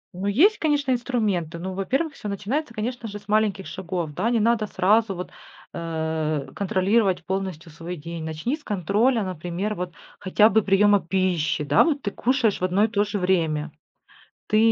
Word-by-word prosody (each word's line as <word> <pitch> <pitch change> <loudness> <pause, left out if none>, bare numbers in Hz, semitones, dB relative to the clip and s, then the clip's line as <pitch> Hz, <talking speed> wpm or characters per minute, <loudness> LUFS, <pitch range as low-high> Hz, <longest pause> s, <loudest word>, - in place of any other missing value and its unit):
Ну 190 +2 -3
есть, 350 - +4
конечно, 290 -3 +1
инструменты. 215 - -1
Ну, 185 +2 -5
во-первых, 270 - -1
всё 210 - -8
начинается, 230 +7 -3
конечно 235 +2 -3
же, 205 -1 -6
с 205 -1 -16
маленьких 210 -2 +1
шагов. 175 -4 -4
Да, 190 +9 0
не 235 -1 +2
надо 225 0 +2
сразу 205 +2 +2
вот, 180 +1 -6 0.4
э, 160 -3 -2
контролировать 195 0 +1
полностью 185 -4 -4
свой 165 +3 -7
день. 165 0 -7
Начни 160 - -2
с 305 - -18
контроля, 210 - +1
например, 185 +3 -3
вот 180 -2 -5 0.3
хотя 210 +3 +4
бы 220 - +3
приема 205 +1 +4
пищи. 175 -4 0
Да, 145 0 +4
вот 295 -4 0
ты 200 - -2
кушаешь 245 -4 +1
в - - -3
одно 185 +3 +2
и 220 - +4
то 205 -2 +1
же 210 0 -3
время, 165 -5 0 0.8
ты, 215 - +2
195 Hz, 175 wpm, -24 LUFS, 175-220 Hz, 0.8 s, есть